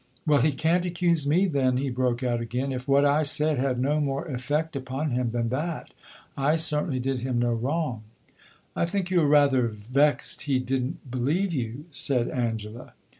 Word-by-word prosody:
"Well, 150 Hz, -4 st, +4 dB
he 150 Hz, +4 st, +3 dB
can't 165 Hz, +5 st, +1 dB
accuse 170 Hz, -4 st, 0 dB
me, 175 Hz, +7 st, +3 dB
then!" 135 Hz, -7 st, +1 dB
he 135 Hz, 0 st, -1 dB
broke 125 Hz, 0 st, -1 dB
out 120 Hz, -2 st, 0 dB
again. 125 Hz, +4 st, -3 dB
"If 125 Hz, 0 st, -5 dB
what 140 Hz, +1 st, +4 dB
I 145 Hz, +2 st, +3 dB
said 150 Hz, -1 st, +2 dB
had 130 Hz, -2 st, 0 dB
no 145 Hz, +4 st, +1 dB
more 140 Hz, -2 st, -1 dB
effect 150 Hz, +3 st, -2 dB
upon 135 Hz, +3 st, -3 dB
him 125 Hz, -1 st, 0 dB
than 115 Hz, 0 st, -1 dB
that, 155 Hz, +6 st, -4 dB, 0.4 s
I 140 Hz, +3 st, +2 dB
certainly 150 Hz, -3 st, 0 dB
did 130 Hz, +1 st, -1 dB
him 125 Hz, 0 st, -2 dB
no 120 Hz, 0 st, +1 dB
wrong." 130 Hz, 0 st, -2 dB, 0.7 s
"I 170 Hz, -, +1 dB
think 185 Hz, 0 st, -2 dB
you 180 Hz, -2 st, +4 dB
are 150 Hz, -, +3 dB
rather 140 Hz, -4 st, +4 dB
vexed 125 Hz, +7 st, 0 dB
he 135 Hz, -, +3 dB
did 130 Hz, 0 st, -1 dB
n't 135 Hz, -2 st, -8 dB
believe 155 Hz, +10 st, 0 dB
you," 125 Hz, +1 st, -4 dB
said 130 Hz, -3 st, 0 dB
Angela. 115 Hz, -1 st, -4 dB
135 Hz, 185 wpm, -26 LUFS, 125-150 Hz, 0.7 s, Well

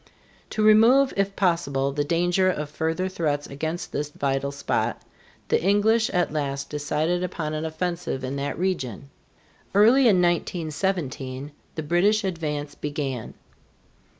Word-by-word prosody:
To 215 Hz, -, -1 dB
remove, 230 Hz, +6 st, +6 dB
if 195 Hz, 0 st, 0 dB
possible, 140 Hz, -7 st, +1 dB
the 145 Hz, +1 st, -1 dB
danger 175 Hz, +4 st, +2 dB
of 150 Hz, -4 st, -3 dB
further 160 Hz, +4 st, -1 dB
threats 150 Hz, -6 st, -1 dB
against 160 Hz, +5 st, -4 dB
this 145 Hz, 0 st, -2 dB
vital 140 Hz, -1 st, -1 dB
spot, 140 Hz, 0 st, -1 dB, 0.5 s
the -, -, +2 dB
English 205 Hz, +4 st, +3 dB
at 180 Hz, -4 st, 0 dB
last 140 Hz, -2 st, -3 dB
decided 150 Hz, +4 st, -1 dB
upon 165 Hz, -4 st, -3 dB
an 155 Hz, +1 st, -2 dB
offensive 165 Hz, -3 st, -3 dB
in 130 Hz, +2 st, -3 dB
that 140 Hz, +1 st, -3 dB
region. 140 Hz, -, -3 dB, 0.6 s
Early 240 Hz, +6 st, +6 dB
in 210 Hz, -, +6 dB
1917, 155 Hz, -5 st, -1 dB, 0.2 s
the 160 Hz, -, -3 dB
British 195 Hz, +7 st, +2 dB
advance 150 Hz, -6 st, -3 dB
began. 145 Hz, -5 st, -4 dB
160 Hz, 130 wpm, -25 LUFS, 145-185 Hz, 0.6 s, remove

